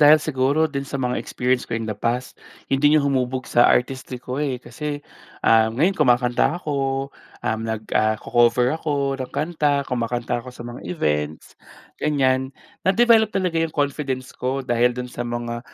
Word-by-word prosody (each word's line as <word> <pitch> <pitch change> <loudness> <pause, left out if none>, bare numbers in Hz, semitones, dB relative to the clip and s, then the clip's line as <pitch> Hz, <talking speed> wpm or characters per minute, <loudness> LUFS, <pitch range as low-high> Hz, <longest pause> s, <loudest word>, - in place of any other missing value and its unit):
dahil 150 +1 +8
siguro 145 0 +1
din 140 -3 -2
sa 140 0 -5
mga 125 -2 -1
experience 125 0 -1
ko 115 - -1
in 115 - -3
the 110 - -2
past, 120 +4 -3 0.3
'yon 135 - +2
din 150 +1 +5
ang 145 - +3
humubog 130 -2 0
sa 120 - +4
artistry 130 0 0
ko, 125 +3 -5
eh. 135 -4 -1
Kasi, 145 +4 -6 0.4
ah 110 0 +5
ngayon 150 - +2
kumakanta 125 -1 +2
ako, 135 -4 -2 0.3
um, 110 0 0
nag 110 -1 -3
ah, 110 0 +3
co-cover 120 +3 +2
ako 145 -3 -1
ng 130 - -3
kanta, 150 -2 0
kumakanta 120 -1 -2
ako 125 - -11
sa 120 -1 -10
mga 120 0 -8
events, 75 - -2 0.5
ganiyan. 130 -3 +1 0.3
Na-develop 220 +3 +4
talaga 180 -5 0
yung 165 -1 -2
confidence 140 -3 -2
ko 130 +1 -3
dahil 120 0 +2
dun 125 0 -5
sa - - -7
mga 120 0 -3
130 Hz, 170 wpm, -22 LUFS, 120-145 Hz, 0.5 s, dahil